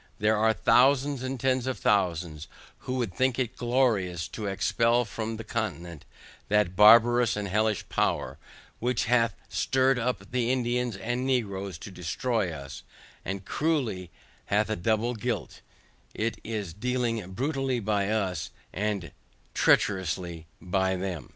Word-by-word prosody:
There 105 +1 +2
are 110 +1 +3
thousands, 135 +4 +3
and 130 0 -4
tens 130 0 +1
of 130 -3 -2
thousands, 85 -6 0 0.3
who 130 - -4
would 120 -8 -2
think 130 +4 +1
it 130 -2 -2
glorious 110 -9 +1
to 105 +2 -5
expel 115 +5 +2
from 110 +1 -4
the 110 - -6
continent, 90 -8 -4 0.4
that 105 -3 +2
barbarous 115 +3 +6
and 105 -1 -2
hellish 105 +2 0
power, - - -1 0.4
which 125 0 0
hath 115 -1 +2
stirred 130 -1 +2
up 125 +2 -3
the 125 -1 +1
Indians 125 -3 0
and 120 +6 -2
Negroes 100 -8 -1
to 100 - -9
destroy 95 +3 -1
us, 70 -3 -8 0.4
the 95 +1 -4
cruelty 115 - -1 0.4
hath 105 +2 +1
a - - +1
double 110 +5 0
guilt, 110 - -4 0.5
it 115 +2 -2
is 105 -6 -4
dealing 115 -3 -2
brutally 135 +1 -1
by 105 -2 0
us, 95 -7 -1 0.2
and 100 -3 -2 0.4
treacherously 90 -4 +1
by 95 +1 0
them. 90 -3 -4
110 Hz, 140 wpm, -27 LUFS, 95-125 Hz, 0.5 s, barbarous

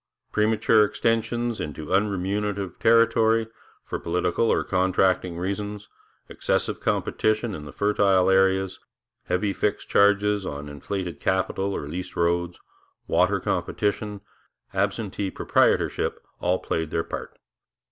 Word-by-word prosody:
Premature 110 0 +3
extension 115 +2 0
into 75 +1 -6
unremunerative 100 0 -1
territory, 115 0 +4 0.4
for - - -4
political 90 +6 0
or - - +2
contracting 95 -1 +1
reasons, 100 +3 -4 0.4
excessive - - -1
competition 110 0 0
in 75 -5 -7
the 75 - -8
fertile 100 -3 +2
areas, 95 0 +2 0.5
heavy 95 +3 0
fixed 105 - -2
charges 100 0 +3
on 75 -4 -5
inflated 90 +5 -5
capital 95 +1 0
or 70 - -4
leased 90 +5 -6
roads, 85 0 0 0.5
water - - +2
competition, 105 0 -2 0.5
absentee 100 -2 -1
proprietorship, - - +1 0.2
all 90 +1 +1
played 80 -3 -2
their 80 - -1
part. - - -7
95 Hz, 110 wpm, -25 LUFS, 90-105 Hz, 0.5 s, territory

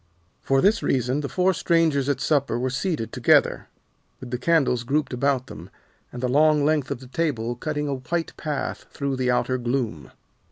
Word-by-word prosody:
For 135 0 +2
this 215 +4 +3
reason 130 +2 0
the 140 - -4
four 185 +1 +2
strangers 160 -5 +1
at 140 -2 0
supper 140 -3 +1
were 130 +1 -1
seated 150 - -2
together, - - +3 0.5
with 125 -2 -9
the 125 - -2
candles 135 -5 +2
grouped 145 +3 -1
about 130 0 0
them, - - -10 0.4
and 125 - -7
the - - +2
long 150 +2 +4
length 150 -3 +1
of 120 - -4
the - - -10
table 125 -5 -2
cutting 150 +3 -3
a 140 - -1
white 150 +6 -3
path 150 -4 -4
through 140 -1 -2
the 130 -1 0
outer 125 +1 +1
gloom. 120 - -2
135 Hz, 185 wpm, -24 LUFS, 125-155 Hz, 0.5 s, long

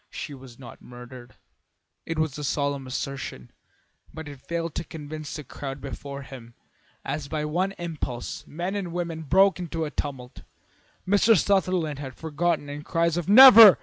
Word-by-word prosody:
She 150 - -7
was 130 -3 -13
not 130 - -12
murdered." 125 0 -12 0.7
It 165 - -3
was 155 -3 0
a - - -5
solemn 140 -1 -1
assertion, 130 - -5 0.6
but 160 -1 -8
it 140 -3 -10
failed 170 0 -4
to - - -3
convince 155 -1 -8
the 150 - -6
crowd 135 +1 -7
before 140 0 -7
him. 120 -3 -12 0.5
As 145 -1 -3
by 150 0 -3
one 180 +6 -1
impulse 155 -9 -5
men 175 +5 -4
and 190 -5 -4
women 170 -2 -3
broke 190 +5 +3
into 165 -2 -3
a 150 - -6
tumult. 130 -4 -6 0.7
Mr. 205 +3 +5
Sutherland 185 -6 +1
was 135 -3 -7
forgotten 160 -1 -1
and 145 +1 -7
cries 165 0 0
of 175 +1 -3
"Never! 230 -3 +11
150 Hz, 160 wpm, -25 LUFS, 140-175 Hz, 0.7 s, Never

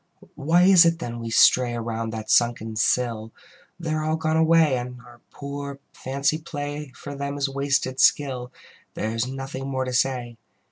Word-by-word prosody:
Why 165 +5 +2
is 185 -2 +7
it 165 0 +2
then 120 -7 -6
we 115 0 -5
stray 120 +1 +4
Around 115 -1 -3
that 110 -1 -5
sunken 115 -2 +2
sill? 115 0 0 0.5
They 160 -2 -3
are 155 0 -1
all 155 +1 0
gone 160 0 -1
away, 160 -3 +4
And 125 0 -5
our 120 0 -17
poor 140 0 -7 0.2
fancy 140 +4 -1
play 145 -3 -6
For 145 - -8
them 140 0 -4
is 140 0 0
wasted 135 -1 -1
skill: 130 -3 +2 0.4
There 110 - -2
is 115 +2 -1
nothing 135 0 -6
more 130 -1 -2
to 130 - -4
say. 125 -2 -1
135 Hz, 175 wpm, -24 LUFS, 120-145 Hz, 0.5 s, is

